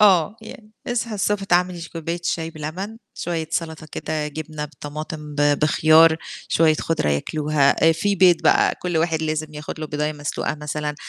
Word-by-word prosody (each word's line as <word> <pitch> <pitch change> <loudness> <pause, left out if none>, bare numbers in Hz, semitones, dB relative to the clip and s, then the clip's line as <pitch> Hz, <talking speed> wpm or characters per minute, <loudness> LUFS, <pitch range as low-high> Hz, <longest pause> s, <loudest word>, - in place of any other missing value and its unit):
آه، 200 -1 +5
يعني 215 -1 -12
أصحي 230 -2 -2
الصبح 205 0 0
تعمل 180 -2 +1
ش 165 - -7
كوباية 165 +1 -4
الشاي 165 -1 -2
بلَبن، 170 +8 -6 0.2
شوية 165 -2 -3
سَلطة 160 -1 -3
كده، 155 -1 -3
جبنة 155 0 -5
بطماطم 150 0 -7
ب 145 0 +3
بخيار 155 +1 +6 0.3
شوية 160 -1 +4
خُضرة 160 - -1
ياكلوها، 145 - +2
آآ - - +6
في 200 +5 0
بيض 180 -2 +6
بقى - - +4
كلّ 175 -2 -1
واحد 160 -1 0
لازم 155 -1 -2
ياخُد 150 +1 -7
له 155 - -3
بيضاية 150 +1 -2
مسلوقة 150 0 -3
مثلًا، 150 0 -4
160 Hz, 170 wpm, -22 LUFS, 150-175 Hz, 0.3 s, بخيار